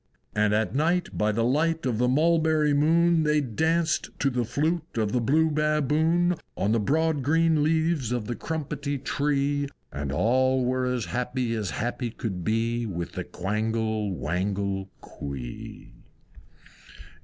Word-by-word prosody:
And 105 0 +2
at 110 +1 0
night 170 +6 0
by 105 0 +1
the 115 +2 0
light 155 +6 +1
of 120 -4 0
the 125 - +3
Mulberry 155 +1 +3
moon 165 +3 +4
They 150 -1 +3
danced 160 +6 0
to 140 - +1
the 125 -1 0
Flute 160 +5 -2
of 110 -2 +1
the 125 - +1
Blue 155 +6 +3
Baboon, 155 +3 +2 0.2
On 100 - +1
the 115 - +3
broad 155 +6 +1
green 160 +2 +3
leaves 160 -4 +1
of 120 -3 -1
the 120 - -3
Crumpetty 145 -2 -3
Tree, 145 +1 0 0.2
And 70 0 -4
all 130 - +2
were 130 0 0
as 125 -3 -1
happy 125 0 -2
as 105 -4 -2
happy 120 +1 -3
could 100 -6 -5
be, 115 +4 0
With 85 -4 -4
the - - -4
Quangle 110 +1 -2
Wangle 95 +3 -2
Quee. 65 -3 -8
130 Hz, 145 wpm, -26 LUFS, 110-155 Hz, 0.2 s, moon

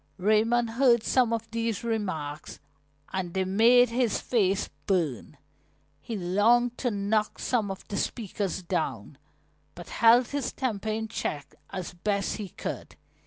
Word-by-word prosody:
Raymond 225 +4 +2
heard 235 -2 +4
some 250 -2 +2
of 230 -1 -2
these 230 -1 -2
remarks 185 -10 -3 0.5
and 185 -2 -3
they 190 0 +1
made 235 +6 +5
his 235 -2 +1
face 200 -5 +1 0.2
burn. 155 - -1 0.6
He 220 +9 -5
longed 225 +7 +3
to 250 - 0
knock 210 0 0
some 225 -5 0
of 195 - -7
the 200 - -4
speakers 200 -5 -3
down, 170 - -3 0.6
but - - -10
held 235 +1 +5
his 285 -3 -3
temper 220 -6 -2
in 220 +1 -2
check 145 -9 -4 0.2
as 185 -3 -6
best 200 +3 -1
he 205 -3 -6
could. - - -6
215 Hz, 140 wpm, -27 LUFS, 190-235 Hz, 0.6 s, made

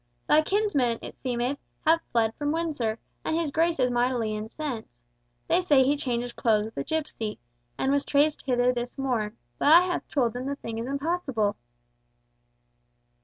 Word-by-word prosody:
Thy 305 - +6
kinsman, 310 - +1
it - - -8
seemeth, 250 +2 -1 0.3
hath 325 +1 +5
fled 225 -2 +2
from 290 +2 -2
Windsor, 295 -9 -1 0.3
and 315 - -1
his 320 -4 -1
Grace 330 +2 +2
is 250 -1 +3
mightily 240 -3 +1
incensed. 220 - -5 0.5
They 365 - +3
say 290 -7 +5
he 280 +3 +3
changed 245 -4 -3
clothes 215 -2 +2
with 220 - -10
a 140 - -1
gipsy, 235 - -3 0.4
and 265 - +1
was 285 0 +2
traced 295 +1 +2
hither 250 -1 +2
this 245 +1 -4
morn, 240 -6 -1 0.2
but 290 - +4
I 335 +2 +10
have 360 -1 -2
told 245 -6 +1
them 250 +2 -4
the 280 - -2
thing 230 -5 -6
is 230 - -4
impossible." 275 -7 -1
260 Hz, 170 wpm, -27 LUFS, 235-305 Hz, 0.5 s, I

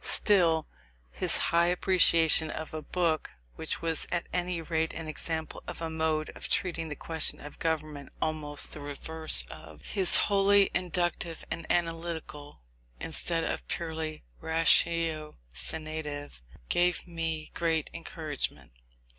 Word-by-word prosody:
Still, 170 -6 +3 0.5
his - - +2
high 170 +1 +2
appreciation 170 -3 +4
of 155 +1 -6
a 155 - -4
book 165 -2 0 0.3
which - - -4
was 165 -1 -1
at 175 -1 0
any 180 -1 -1
rate 160 0 -1
an 160 -1 -5
example 160 +1 -4
of - - -6
a 165 -1 -4
mode 160 -1 0
of - - -7
treating 165 -3 0
the 150 - -5
question 160 +1 0
of 150 - -11
government 155 -3 -2
almost 150 -2 +2
the - - -4
reverse 145 - +4
of 75 -1 -12
his 190 -3 +3
wholly 200 0 +4
inductive 175 -2 -2
and 165 - -4
analytical, 165 - -3 0.4
instead 165 -1 0
of - - -3
purely 160 -2 -4 0.2
ratiocinative 155 - 0 0.3
gave 175 0 +1
me 165 -2 -4
great 165 -2 0
encouragement. 160 -3 -5
160 Hz, 125 wpm, -29 LUFS, 155-170 Hz, 0.5 s, appreciation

